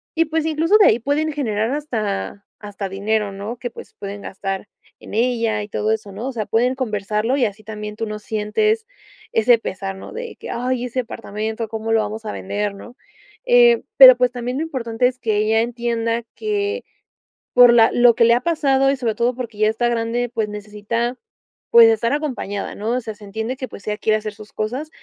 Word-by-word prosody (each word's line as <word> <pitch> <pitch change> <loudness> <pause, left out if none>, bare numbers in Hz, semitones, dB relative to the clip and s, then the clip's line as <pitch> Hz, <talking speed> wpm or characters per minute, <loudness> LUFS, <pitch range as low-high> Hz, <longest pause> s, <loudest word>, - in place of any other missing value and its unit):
y 330 0 +3
pues 315 0 -1
incluso 320 +6 +3
de 415 - +7
ahí 225 - +4
pueden 295 +5 0
generar 225 -5 -1
hasta 215 -8 -3 0.2
hasta 205 -1 -6
dinero, 205 +1 -1
¿no?, 200 +5 -6
que 245 +1 -5
pues - - -12
pueden 200 0 -7
gastar 195 +1 -5 0.3
en - - -12
ella 230 -2 +1
y 205 - -9
todo 215 +1 0
eso, 210 -2 -5
¿no?, 215 +6 -5
o 270 - -4
sea, 220 -3 -3
pueden 245 +5 +1
conversarlo 215 0 -1
y 255 - +3
así 215 +1 -5
también 210 0 -7
tú 225 - -3
no 210 0 -5
sientes 225 - 0 0.5
ese 230 +2 +4
pesar, 195 -2 -5
¿no?, 190 - -10
de 470 0 -7
que: - - -9
"Ay, 250 +1 -1
ese 250 +1 -2
apartamento, 220 -1 -5
¿cómo 225 0 -2
lo 225 - +4
vamos 215 +1 -5
a 210 - -4
vender?", 205 +1 -3
¿No?, 240 +5 -12 0.5
eh, 485 -1 +5
pero 255 -2 +11
pues 250 -1 +2
también 245 +1 -3
lo 305 - -1
importante 250 -6 0
es 250 0 -5
que 215 -4 0
ella 220 +1 +2
entienda 235 -1 -1
que 420 +2 -2 0.7
por 245 -1 +8
la 225 -1 +6
lo 240 -1 +5
que 230 - +4
le 235 0 +6
ha 245 - +2
pasado 275 -4 +2
y - - 0
sobre 235 -4 -1
todo 240 +1 0
porque 230 -4 -7
ya 215 - +4
está 240 +2 0
grande, 235 +1 -1
pues 220 -3 -1
necesita, 210 +4 -3 0.6
pues 230 -1 +9
estar 225 +2 +1
acompañada, 255 -9 -3
¿no?, 215 +3 -3
o 250 - 0
sea, 220 -2 -6
se 205 - -16
entiende 220 +5 -4
que 260 - -5
pues 200 - -12
ella 210 0 -1
quiere 215 -1 +2
hacer 215 -1 -6
sus 215 0 -13
cosas, 255 +8 -3
230 Hz, 210 wpm, -20 LUFS, 210-255 Hz, 0.7 s, pero